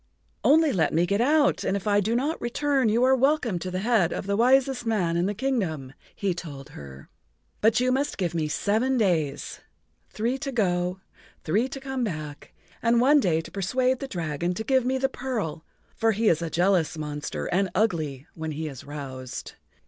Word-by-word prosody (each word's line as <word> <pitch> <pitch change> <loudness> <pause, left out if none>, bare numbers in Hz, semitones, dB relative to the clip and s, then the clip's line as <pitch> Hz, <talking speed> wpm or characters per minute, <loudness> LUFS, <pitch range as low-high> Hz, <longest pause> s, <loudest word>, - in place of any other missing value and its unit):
"Only 310 0 +5
let 165 -5 +1
me 170 +2 +3
get 200 +4 +1
out, 290 +3 +3
and 195 - 0
if 195 - -8
I 205 -1 +3
do 220 +3 0
not 290 +7 -1
return 265 0 +1
you 230 +3 +2
are 260 +1 +5
welcome 260 - +1
to 185 - -4
the 185 +1 -3
head 215 -6 +2
of - - -4
the 200 0 0
wisest 255 +2 +3
man 200 -8 0
in 175 +2 +1
the 205 - -2
kingdom," 185 - -2 0.2
he 195 -3 -1
told 150 -5 -8
her. 70 - -11 0.5
"But 220 +2 +4
you 255 +1 +2
must 275 +3 0
give 175 -4 -1
me 160 -2 -1
seven 220 +11 +1
days—three 200 - -3
to 275 -2 -4
go, 180 -5 0 0.4
three 210 +10 +1
to 270 - -7
come 265 -1 -3
back, 155 -8 -5 0.3
and 235 +1 +3
one 285 +5 +5
day 165 - +1
to - - -12
persuade 255 +7 0
the 275 - -5
dragon 170 - -2
to 220 - -3
give 260 +1 +2
me 260 +1 +1
the 270 +1 +1
pearl,[Pg 230 - -4 0.3
61] - - -35
for 225 0 +2
he 220 +2 +2
is 165 0 +2
a 165 - -2
jealous 175 -2 +1
monster 150 -1 -4
and 190 +2 +1
ugly 155 - 0
when 160 -1 -5
he 155 +2 -4
is 135 -4 -8
roused. 135 -3 -7
200 Hz, 195 wpm, -26 LUFS, 160-255 Hz, 0.5 s, Only